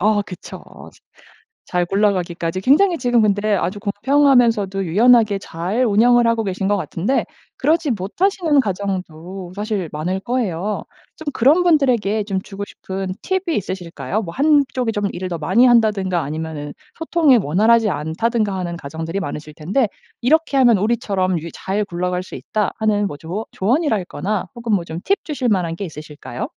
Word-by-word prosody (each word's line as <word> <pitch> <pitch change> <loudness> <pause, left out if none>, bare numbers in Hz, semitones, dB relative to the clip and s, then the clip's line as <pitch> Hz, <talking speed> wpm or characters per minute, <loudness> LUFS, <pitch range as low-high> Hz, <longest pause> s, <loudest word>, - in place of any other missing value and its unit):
어 210 +1 +3
그쵸. 180 -3 -10 1.0
잘 180 -1 +1
굴러가기까지 185 -3 0
굉장히 335 - +4
지금 245 -6 +2
근데 210 0 +2
아주 185 +3 -2
공평하면서도 225 -3 +2
유연하게 215 +3 +4
잘 190 +9 -2
운영을 240 +2 +4
하고 230 -1 +1
계신 195 0 -2
것 205 - +2
같은데 200 +6 -1 0.3
그러지 315 -1 +1
못하시는 300 - +1
가정도 185 -3 -4
사실 205 -4 -2
많을 180 +6 -2
거예요. 210 -4 -2 0.3
좀 315 - -11
그런 290 +9 +4
분들에게 245 - +2
좀 195 -2 -2
주고 200 0 -8
싶은 190 0 -5
팁이 375 -3 -1
있으실까요? 180 -1 -3
뭐 165 -5 -6
한쪽이 275 - +2
좀 205 -1 -1
일을 185 +1 -4
더 170 -2 -4
많이 195 +11 +4
한다든가 210 -7 +3
아니면은 155 0 -5 0.3
소통이 325 -6 +4
원활하지 215 +8 +3
않다든가 205 +7 -1
하는 175 -2 -3
가정들이 160 +3 -5
많으실 150 -5 -5
텐데 200 - 0 0.3
"이렇게 300 +3 +2
하면 240 -5 +5
우리처럼 195 -4 0
유 170 - -6
잘 200 +2 -2
굴러갈 180 -1 -2
수 185 - -9
있다." 210 -2 -2
하는 210 -2 +1
뭐 145 - -7
조어 175 +9 -5
조언이랄 225 - +1
거나 195 +2 -3
혹은 235 -2 -3
뭐 190 -4 +2
좀 165 0 -6
팁 395 - +1
주실 280 -5 -2
만한 180 -5 +1
게 200 - -5
있으실까요? 150 -3 -7
205 Hz, 360 characters per minute, -20 LUFS, 180-240 Hz, 1.0 s, 하면